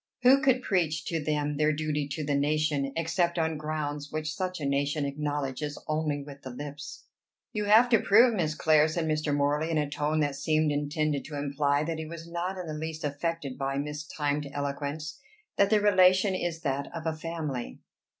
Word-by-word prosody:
Who 265 +2 +7
could 260 -2 +3
preach 165 -6 0
to 165 -3 -2
them 150 -1 -1
their 155 +1 +3
duty 150 -1 -1
to 145 +2 -4
the 145 0 -1
nation, 145 -1 +1
except 170 +1 0
on 160 -1 +1
grounds 150 -1 -4
which 155 0 -3
such 185 +1 -3
a 145 - -3
nation 140 +1 0
acknowledges 145 0 -3
only 155 -2 -1
with 140 -1 -11
the 130 - -7
lips?" 145 +3 -8 0.5
"You 210 -2 -1
have 220 +4 +6
to 230 -3 +5
prove, 230 +5 +5
Miss 160 -7 0
Clare," 155 0 +4
said 160 +1 -2
Mr. 155 -1 0
Morley, 145 +2 +1
in 165 - 0
a 150 -1 +1
tone 150 +2 -1
that 145 -2 0
seemed 155 +2 +1
intended 145 0 -1
to 150 -1 -6
imply 145 0 +1
that 160 0 -3
he 160 - -5
was 165 +1 -8
not 175 +3 -3
in 180 - -5
the 155 - -5
least 160 +1 -5
affected 145 -1 -3
by 135 0 -1
mistimed 150 0 -2
eloquence, 145 - -4 0.4
"that 200 - +4
the 215 - +4
relation 190 -1 +5
is 175 -3 -2
that 140 -2 -1
of 165 -1 -6
a 160 - 0
family." 155 - -4
155 Hz, 190 wpm, -28 LUFS, 145-165 Hz, 0.5 s, Who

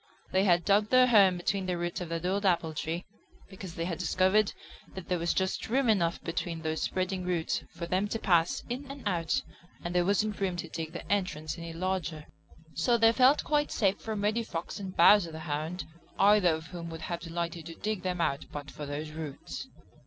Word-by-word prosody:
They 190 +1 +3
had 175 -3 +3
dug 205 +1 +3
their 255 0 +6
home 200 -7 +5
between 190 +1 -1
the 180 -1 -1
roots 175 +1 -3
of 175 - -5
that 165 +1 -3
old 195 +3 0
apple 170 -4 +2
tree 165 +3 -3 0.5
because 185 -3 -8
they 165 - -2
had 170 -1 -3
discovered 190 +4 +3 0.4
that 190 -2 -8
there 180 -1 +1
was 170 0 +1
just 190 +2 -1
room 260 +2 +2
enough 170 -6 +2
between 165 -1 -3
those 160 0 -2
spreading 185 0 -1
roots 175 -3 -1
for 170 - -6
them 185 +4 0
to 225 - -2
pass 175 -6 +2
in 255 +3 -5
and 275 -5 -6
out, 170 -4 0 0.4
and 175 0 -3
there 180 0 +3
wasn't 205 +2 +1
room 190 -2 0
to 170 -1 -5
dig 160 0 -5
the - - -7
entrance 165 -6 -1
any 170 -1 -7
larger. 170 -3 -3 0.5
So 235 - +2
they 225 0 +6
felt 260 +4 +5
quite 295 -1 +1
safe 200 -2 +1
from 215 -2 -3
Reddy 215 +3 +2
Fox; 175 -4 -5
and 190 -2 -7
Bowser 175 0 +6
the 160 0 -7
Hound, 155 +2 -3 0.3
either 200 -2 +5
of 160 +1 -8
whom 170 -1 -7
would 165 0 -7
have 170 +1 -3
delighted 170 -1 -4
to 165 - -8
dig 215 0 -3
them 180 -1 -2
out 140 -4 0
but 145 -1 -7
for 145 +3 -7
those 150 +2 -4
roots. 155 -3 -7
180 Hz, 210 wpm, -30 LUFS, 165-200 Hz, 0.5 s, their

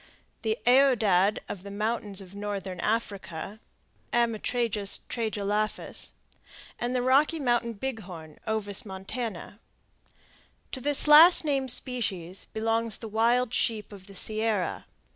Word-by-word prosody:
the 220 0 0
aoudad 225 -7 +4
of 190 - -6
the 200 - -9
mountains 210 -1 -2
of 190 0 -12
northern 200 -3 -5
Africa 200 -3 -3 0.5
(Ammotragus 230 -3 +1
tragelaphus); 215 -2 -2 0.7
and 245 +1 -2
the 250 - +1
Rocky 280 +6 +4
Mountain 240 -4 0
bighorn 195 -10 -7
(O. 220 -1 -1 0.2
montana, 200 +1 -6
Cuv.). - - -39 0.5
To 260 - -5
this 290 +2 +2
last 320 +3 +8
named 270 -3 0
species 200 -8 -3
belongs 225 0 0
the 225 - -7
wild 230 +3 +2
sheep 220 -4 +1
of 195 -1 -12
the 200 - -11
Sierra. 215 -2 -1
220 Hz, 120 wpm, -28 LUFS, 200-245 Hz, 0.7 s, last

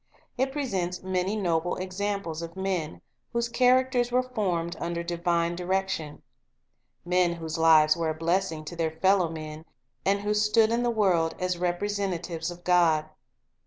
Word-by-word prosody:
Jt 265 +1 +1
presents 190 -12 -2
many 185 +2 -1
noble 175 -4 0
examples 185 -3 -3
of 170 +1 -7
men 185 - -3 0.3
whose 235 0 0
characters 250 0 +3
were 250 +1 +3
formed 185 -9 -2
under 170 0 -3
divine 170 0 0
direction; 180 -4 -2 0.8
men 180 -1 +2
whose 165 -1 -5
lives 155 -1 +6
were 165 -2 -1
a 155 - -2
blessing 165 -1 -1
to 170 - -7
their 165 -1 0
fellow 190 -3 +3
men, 155 -1 -7 0.4
and 200 +1 +1
who 210 +1 0
stood 215 +1 +3
in 235 +1 +1
the 240 - +1
world 185 -8 +2
as 180 -1 -1
repre 175 +1 -1
sentatives 180 -5 -3
of 175 0 -10
God. 165 -3 +3
180 Hz, 155 wpm, -27 LUFS, 165-200 Hz, 0.8 s, lives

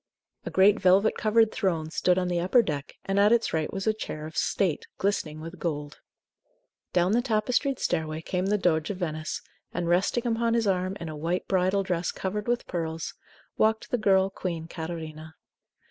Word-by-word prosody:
A - - 0
great 195 +2 +5
velvet 195 +3 +4
covered 225 0 +3
throne 160 -5 -1
stood 180 +2 +2
on 180 -1 +1
the 175 -1 0
upper 190 +8 +4
deck, 145 -6 -4
and 195 +1 +1
at 205 +2 +5
its 235 -1 +2
right 160 -1 0
was 195 0 -4
a 220 - +3
chair 155 -8 -6
of 155 0 -9
state, 180 -4 0
glistening 160 -6 -1
with 165 +2 -8
gold. 150 -3 -4 0.9
Down 180 +1 +2
the 235 +3 +3
tapestried 245 +3 +1
stairway 160 -2 -2
came 185 +2 -1
the 210 +1 +2
Doge 160 -5 +1
of 200 - -3
Venice, 155 -3 -3 0.3
and, 175 0 -2
resting 190 +7 +2
upon 230 0 +1
his 230 -1 +2
arm, 185 0 0
in 170 - -5
a 155 - -5
white 165 +4 -2
bridal 190 +1 +2
dress 180 -2 -1
covered 205 +3 -4
with 240 0 0
pearls, 165 -1 -3 0.5
walked 220 0 +2
the 245 - +1
girl 195 -2 +3
queen 170 -4 -4
Catarina. 160 -2 -7
185 Hz, 185 wpm, -27 LUFS, 160-210 Hz, 0.9 s, great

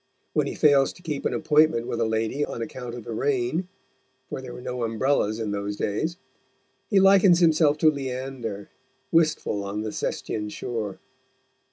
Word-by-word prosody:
When - - +1
he - - -4
fails 140 -3 +4
to 180 - -18
keep 150 -4 -2
an - - -3
appointment 155 -5 +3
with 115 - -3
a - - +3
lady 110 +6 -1
on 115 - -4
account 120 0 -7
of 120 - -8
the 115 - -6
rain 135 +7 0 0.6
for - - -5
there 130 -2 -8
were - - -8
no 125 0 -4
umbrellas 115 -1 +1
in 110 -2 -2
those 100 0 -3
days 155 - -2 0.7
he 200 - +4
likens 195 -2 +6
himself 160 -3 +4
to 155 0 +5
Leander, 130 -6 -5 0.4
wistful 155 -10 +2
on 100 +2 -3
the 110 0 -3
Sestian 105 0 -3
shore. 105 -3 -4
125 Hz, 170 wpm, -25 LUFS, 110-155 Hz, 0.7 s, likens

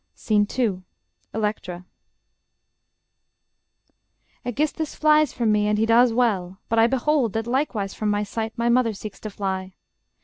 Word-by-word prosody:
SCENE 210 -2 +1
II 210 -8 0 0.5
ELECTRA - - -12
Electra 210 -5 -3 2.6
Aegisthus 300 +5 -2
flies 305 -2 +4
from 230 -3 0
me, 210 0 +2
and 210 0 +1
he 220 - +2
does 235 +2 +5
well; 200 -6 0
But 230 0 +2
I 225 - +6
behold 265 -2 +1
that 225 0 -2
likewise 235 -6 -1
from 215 - -2
my 205 0 +1
sight 220 +3 -4
My 235 0 0
mother 240 -2 +3
seeks 210 0 -9
to 215 - -6
fly. 190 -2 -4
225 Hz, 145 wpm, -23 LUFS, 205-245 Hz, 2.6 s, I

